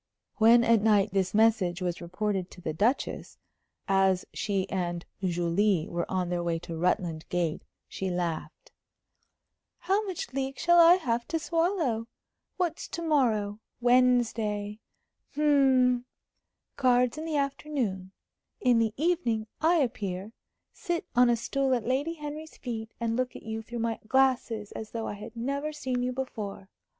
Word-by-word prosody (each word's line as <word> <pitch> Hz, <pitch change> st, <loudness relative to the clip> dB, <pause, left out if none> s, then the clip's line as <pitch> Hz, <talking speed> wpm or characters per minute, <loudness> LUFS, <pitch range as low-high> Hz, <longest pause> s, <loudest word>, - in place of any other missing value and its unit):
When 230 Hz, +2 st, +6 dB
at 230 Hz, -2 st, +4 dB
night 210 Hz, -1 st, +3 dB
this 190 Hz, 0 st, 0 dB
message 215 Hz, -6 st, +3 dB
was 180 Hz, -2 st, -3 dB
reported 185 Hz, +1 st, -2 dB
to -, -, -13 dB
the 160 Hz, -3 st, -4 dB
Duchess, 220 Hz, -, -1 dB, 0.5 s
as 190 Hz, -1 st, +3 dB
she 195 Hz, -2 st, -1 dB
and 175 Hz, -2 st, -2 dB, 0.2 s
Julie 175 Hz, 0 st, +1 dB
were 170 Hz, 0 st, -3 dB
on 185 Hz, -2 st, -1 dB
their 175 Hz, -1 st, -1 dB
way 170 Hz, -1 st, -1 dB
to 165 Hz, 0 st, -7 dB
Rutland 165 Hz, -1 st, -1 dB
Gate, 170 Hz, -3 st, -1 dB, 0.3 s
she 190 Hz, -, -4 dB
laughed. 175 Hz, -, -4 dB, 1.1 s
"How 390 Hz, +4 st, +1 dB
much 345 Hz, -9 st, -5 dB
leek 270 Hz, 0 st, -2 dB
shall 345 Hz, 0 st, +4 dB
I 340 Hz, +1 st, +9 dB
have 240 Hz, -9 st, -1 dB
to 330 Hz, -, -1 dB
swallow? 330 Hz, -, 0 dB, 0.5 s
What's 345 Hz, -3 st, -2 dB
to 335 Hz, -, -5 dB
morrow? 220 Hz, -10 st, +1 dB, 0.2 s
Wednesday. 235 Hz, -4 st, +2 dB, 0.6 s
Hm 265 Hz, -4 st, +3 dB, 0.7 s
cards 250 Hz, +1 st, +3 dB
in 315 Hz, -, -5 dB
the 315 Hz, -2 st, -1 dB
afternoon; 270 Hz, -9 st, -2 dB, 0.5 s
in 245 Hz, -2 st, +3 dB
the 225 Hz, -1 st, 0 dB
evening 285 Hz, -9 st, 0 dB, 0.2 s
I 330 Hz, +3 st, +4 dB
appear, 215 Hz, -, -2 dB, 0.4 s
sit 345 Hz, -5 st, -3 dB
on 245 Hz, 0 st, +6 dB
a 240 Hz, -, +4 dB
stool 265 Hz, +3 st, 0 dB
at 235 Hz, -, -3 dB
Lady 280 Hz, +7 st, 0 dB
Henry's 300 Hz, +1 st, -7 dB
feet, 225 Hz, -3 st, -5 dB
and 230 Hz, -1 st, -1 dB
look 255 Hz, 0 st, -1 dB
at -, -, -9 dB
you 220 Hz, 0 st, -4 dB
through 240 Hz, +2 st, -8 dB
my 230 Hz, -1 st, -1 dB
glasses 245 Hz, -4 st, +1 dB
as 220 Hz, -, -8 dB
though 230 Hz, -1 st, -3 dB
I -, -, -3 dB
had 210 Hz, +3 st, -10 dB
never 280 Hz, +6 st, -2 dB
seen 260 Hz, -4 st, -2 dB
you 250 Hz, 0 st, 0 dB
before. 215 Hz, -7 st, -5 dB
230 Hz, 150 wpm, -28 LUFS, 195-270 Hz, 1.1 s, I